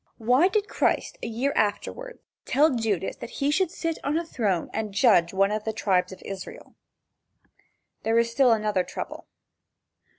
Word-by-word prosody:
Why 250 +9 +4
did 420 +1 0
Christ - - 0
a - - -4
year 240 +5 -1
afterward, 480 - -2 0.3
tell 295 +2 +3
Judas 215 -6 -1
that 235 - -8
he 285 0 +1
should 365 +3 +2
sit 330 -2 -3
on 295 +3 0
a 335 - -2
throne 200 - -1
and 215 -2 -3
judge 205 -7 +4
one 195 +1 +2
of 215 0 -2
the 220 - -3
tribes 190 -4 +1
of 190 - -11
Israel? 195 -2 -8 1.3
There 225 +1 +1
is 230 0 +2
still 250 +1 +4
another 210 -4 +1
trouble. - - -7
225 Hz, 165 wpm, -26 LUFS, 205-285 Hz, 1.3 s, Why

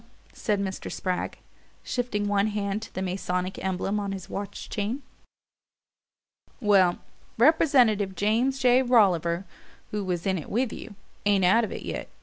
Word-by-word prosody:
said 210 -2 -1
Mr. 190 -1 -4
Spragg, 185 -1 -3 0.5
shifting 235 -5 -2
one 205 0 +2
hand 205 0 -2
to 225 - -9
the 190 - -2
Masonic 180 0 -3
emblem 190 +2 -1
on 200 -1 -3
his 190 -3 -8
watch 200 0 -5
chain. 225 +7 -3 1.6
"Well, 195 -6 +4 0.4
Representative 240 -8 +4
James 230 +7 +1
J. 250 -1 +4
Rolliver, 190 -8 +3 0.5
who 210 -1 -2
was 180 -2 -2
in 190 -2 +1
it 155 - -9
with 240 +2 0
you, 220 - -9 0.3
ain't 200 -2 +4
out 225 +6 +5
of 220 - -3
it - - -6
yet. - - -5
205 Hz, 145 wpm, -26 LUFS, 190-225 Hz, 1.6 s, out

